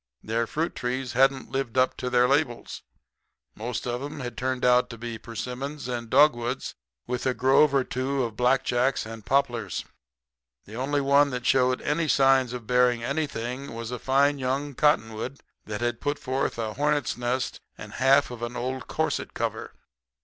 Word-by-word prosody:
"Their 115 Hz, +1 st, -1 dB
fruit 160 Hz, +8 st, -2 dB
trees 125 Hz, +1 st, -3 dB
hadn't 135 Hz, +1 st, +2 dB
lived 135 Hz, -2 st, -2 dB
up 130 Hz, 0 st, +3 dB
to 125 Hz, -, -3 dB
their 125 Hz, 0 st, +4 dB
labels. 135 Hz, -3 st, -1 dB, 0.7 s
Most 120 Hz, +3 st, -4 dB
of 120 Hz, 0 st, -2 dB
'em 145 Hz, +1 st, -6 dB
had 120 Hz, -2 st, -5 dB
turned 130 Hz, +1 st, -1 dB
out 125 Hz, 0 st, +4 dB
to 115 Hz, -, -8 dB
be 115 Hz, -1 st, -6 dB
persimmons 125 Hz, +6 st, -5 dB
and 120 Hz, -2 st, -4 dB
dogwoods, 125 Hz, -2 st, +3 dB, 0.3 s
with 125 Hz, +1 st, -2 dB
a 130 Hz, -, +1 dB
grove 135 Hz, +5 st, +4 dB
or 135 Hz, -1 st, +2 dB
two 130 Hz, +2 st, -1 dB
of 115 Hz, -3 st, -4 dB
blackjacks 125 Hz, +1 st, +2 dB
and 110 Hz, -1 st, -8 dB
poplars. 135 Hz, -4 st, 0 dB, 0.8 s
The 105 Hz, -, -10 dB
only 140 Hz, +4 st, 0 dB
one 140 Hz, +1 st, +4 dB
that 125 Hz, -2 st, -4 dB
showed 130 Hz, -1 st, +3 dB
any 155 Hz, +2 st, 0 dB
signs 135 Hz, -3 st, +4 dB
of 125 Hz, -2 st, -6 dB
bearing 125 Hz, 0 st, +3 dB
anything 135 Hz, -2 st, -3 dB
was 115 Hz, +1 st, -5 dB
a 125 Hz, -, -4 dB
fine 140 Hz, +2 st, +2 dB
young 135 Hz, +3 st, -2 dB
cottonwood 125 Hz, -2 st, 0 dB, 0.3 s
that 105 Hz, +1 st, -5 dB
had 120 Hz, -1 st, -1 dB
put 145 Hz, 0 st, -1 dB
forth 130 Hz, -3 st, -2 dB
a 110 Hz, -2 st, -3 dB
hornet's 145 Hz, -1 st, 0 dB
nest 125 Hz, +1 st, -2 dB, 0.2 s
and -, -, -9 dB
half 135 Hz, 0 st, +4 dB
of 120 Hz, -1 st, -8 dB
an 120 Hz, +1 st, -4 dB
old 130 Hz, +1 st, -4 dB
corset -, -, -2 dB
cover. -, -, -3 dB
125 Hz, 170 wpm, -26 LUFS, 120-135 Hz, 0.8 s, their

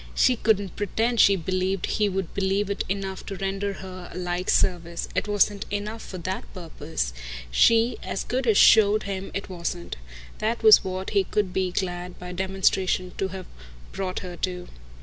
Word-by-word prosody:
She 255 Hz, -, +4 dB
couldn't 205 Hz, -4 st, +1 dB
pretend 225 Hz, +4 st, 0 dB
she 200 Hz, -, +7 dB
believed 185 Hz, +2 st, -1 dB
he 210 Hz, -1 st, +1 dB
would 190 Hz, -2 st, -3 dB
believe 195 Hz, +1 st, 0 dB
it 200 Hz, -, -1 dB
enough 195 Hz, -1 st, -3 dB
to 195 Hz, -, -4 dB
render 195 Hz, +1 st, -2 dB
her 185 Hz, -1 st, -8 dB
a -, -, -8 dB
like 180 Hz, 0 st, -2 dB
service. 170 Hz, -2 st, +1 dB
It -, -, -1 dB
wasn't 205 Hz, 0 st, +1 dB
enough 210 Hz, +2 st, -4 dB
for 185 Hz, -, -8 dB
that 185 Hz, +2 st, -5 dB
purpose 160 Hz, -, -4 dB, 0.4 s
she 230 Hz, -, +4 dB
as -, -, -3 dB
good 250 Hz, 0 st, -2 dB
as 215 Hz, -3 st, +4 dB
showed 215 Hz, -1 st, +6 dB
him 195 Hz, -1 st, -4 dB
it 200 Hz, -, -3 dB
wasn't. 175 Hz, -, -5 dB, 0.4 s
That 225 Hz, +2 st, -1 dB
was 220 Hz, -1 st, +8 dB
what 185 Hz, 0 st, -4 dB
he 200 Hz, -2 st, +3 dB
could 190 Hz, -1 st, -1 dB
be 185 Hz, -1 st, 0 dB
glad, 180 Hz, -1 st, -3 dB
by 180 Hz, 0 st, -8 dB
demonstration, 185 Hz, 0 st, 0 dB
to 195 Hz, -, +1 dB
have 190 Hz, -1 st, -7 dB, 0.5 s
brought 185 Hz, -1 st, -3 dB
her 180 Hz, -2 st, -7 dB
to. 180 Hz, 0 st, -3 dB
190 Hz, 175 wpm, -25 LUFS, 180-205 Hz, 0.5 s, was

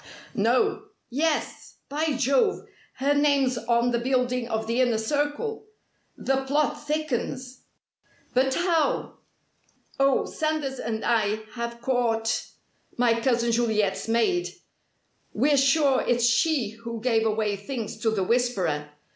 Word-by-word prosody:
"No. 415 Hz, -1 st, +1 dB, 0.3 s
Yes! 305 Hz, +4 st, -2 dB
By 305 Hz, +2 st, -1 dB
Jove, 275 Hz, -, +1 dB, 0.3 s
her 280 Hz, +2 st, +1 dB
name's 285 Hz, -3 st, +2 dB
on 235 Hz, +1 st, +1 dB
the 235 Hz, -, +1 dB
building 250 Hz, -1 st, 0 dB
of 220 Hz, -1 st, -2 dB
the 230 Hz, +3 st, +1 dB
Inner 240 Hz, -3 st, +2 dB
Circle! 290 Hz, -, -2 dB, 0.5 s
The 270 Hz, 0 st, 0 dB
plot 295 Hz, +1 st, 0 dB
thickens." 265 Hz, -4 st, -3 dB, 0.7 s
"But 260 Hz, +1 st, +2 dB
how?" 335 Hz, -4 st, 0 dB, 0.8 s
"Oh, 275 Hz, 0 st, +3 dB
Sanders 310 Hz, -4 st, -2 dB
and 220 Hz, -1 st, -3 dB
I 220 Hz, -2 st, +1 dB
have 235 Hz, 0 st, -5 dB
caught 235 Hz, -3 st, 0 dB, 0.5 s
my 230 Hz, -1 st, +2 dB
cousin 235 Hz, -2 st, +1 dB
Juliet's 220 Hz, -4 st, 0 dB
maid. 235 Hz, +11 st, +1 dB, 0.9 s
We're 285 Hz, +6 st, +3 dB
sure 275 Hz, 0 st, +3 dB
it's 240 Hz, -1 st, +2 dB
she 245 Hz, 0 st, +2 dB
who 230 Hz, +1 st, -7 dB
gave 225 Hz, -1 st, +1 dB
away 215 Hz, -2 st, 0 dB
things 225 Hz, +2 st, -5 dB
to 220 Hz, -, +1 dB
the 210 Hz, -3 st, 0 dB
'Whisperer.' 185 Hz, -10 st, 0 dB
245 Hz, 120 wpm, -25 LUFS, 230-285 Hz, 0.9 s, Oh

